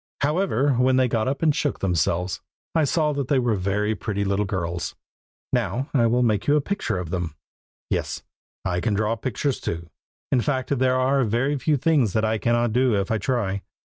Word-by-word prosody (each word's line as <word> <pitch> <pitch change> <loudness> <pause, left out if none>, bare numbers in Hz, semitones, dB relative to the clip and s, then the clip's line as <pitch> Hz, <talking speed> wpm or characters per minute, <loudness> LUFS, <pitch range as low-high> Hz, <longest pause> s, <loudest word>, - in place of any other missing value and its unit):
However, 145 -2 +2
when 130 +1 +3
they 130 -1 +4
got 115 -1 0
up 140 +4 -2
and 155 -3 +4
shook 145 -3 0
themselves, 90 0 0 0.3
I 160 -2 +3
saw 150 +1 +1
that 140 -3 -2
they 140 - +2
were 120 -3 +2
very 105 +2 0
pretty 100 +1 -2
little 100 +1 0
girls. 85 -2 -3 0.6
Now 135 +5 -1
I 120 -5 +4
will 120 +2 +2
make 105 -4 +1
you 145 - +5
a - - +4
picture 200 - -2
of 90 -2 -5
them. 85 -4 -3 0.6
Yes, - - -2 0.4
I 90 -1 0
can 100 +4 0
draw 110 +2 +1
pictures 130 +4 -2
too; 85 0 -5 0.4
in 125 - +3
fact, 135 +1 0
there 130 0 +3
are 130 +1 +2
very 120 +6 +1
few 150 +3 +2
things 135 - +2
that 110 0 +2
I 110 0 0
cannot 120 0 +1
do 125 -2 +3
if 100 - -2
I 110 - +1
try. 105 -7 -1
120 Hz, 200 wpm, -24 LUFS, 100-135 Hz, 0.6 s, you